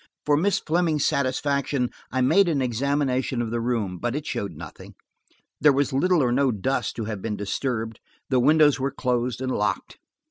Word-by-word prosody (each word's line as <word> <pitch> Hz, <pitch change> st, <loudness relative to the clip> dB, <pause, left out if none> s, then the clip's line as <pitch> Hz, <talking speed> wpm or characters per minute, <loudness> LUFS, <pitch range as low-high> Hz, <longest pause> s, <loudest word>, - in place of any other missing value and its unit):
For 150 Hz, -, +3 dB
Miss 190 Hz, +7 st, +2 dB
Fleming's 160 Hz, -2 st, 0 dB
satisfaction 140 Hz, -1 st, 0 dB, 0.2 s
I 130 Hz, -, 0 dB
made 170 Hz, +9 st, +4 dB
an 150 Hz, -4 st, +1 dB
examination 130 Hz, 0 st, 0 dB
of 115 Hz, -2 st, -2 dB
the 120 Hz, 0 st, -1 dB
room, 110 Hz, -7 st, -2 dB
but 120 Hz, +5 st, -2 dB
it 150 Hz, 0 st, -4 dB
showed 100 Hz, -8 st, -3 dB
nothing. -, -, -11 dB, 0.6 s
There 150 Hz, +1 st, +6 dB
was 140 Hz, 0 st, 0 dB
little 170 Hz, +3 st, +3 dB
or 125 Hz, -, +1 dB
no 135 Hz, +1 st, +2 dB
dust 120 Hz, +6 st, -2 dB
to 115 Hz, -, -4 dB
have 105 Hz, -3 st, -5 dB
been 105 Hz, -1 st, -3 dB
disturbed; 115 Hz, +2 st, -3 dB, 0.3 s
the 130 Hz, -2 st, +2 dB
windows 150 Hz, +2 st, +4 dB
were 135 Hz, +1 st, 0 dB
closed 125 Hz, -2 st, -2 dB
and 130 Hz, 0 st, -2 dB
locked. 100 Hz, -5 st, -2 dB
130 Hz, 180 wpm, -24 LUFS, 120-145 Hz, 0.6 s, There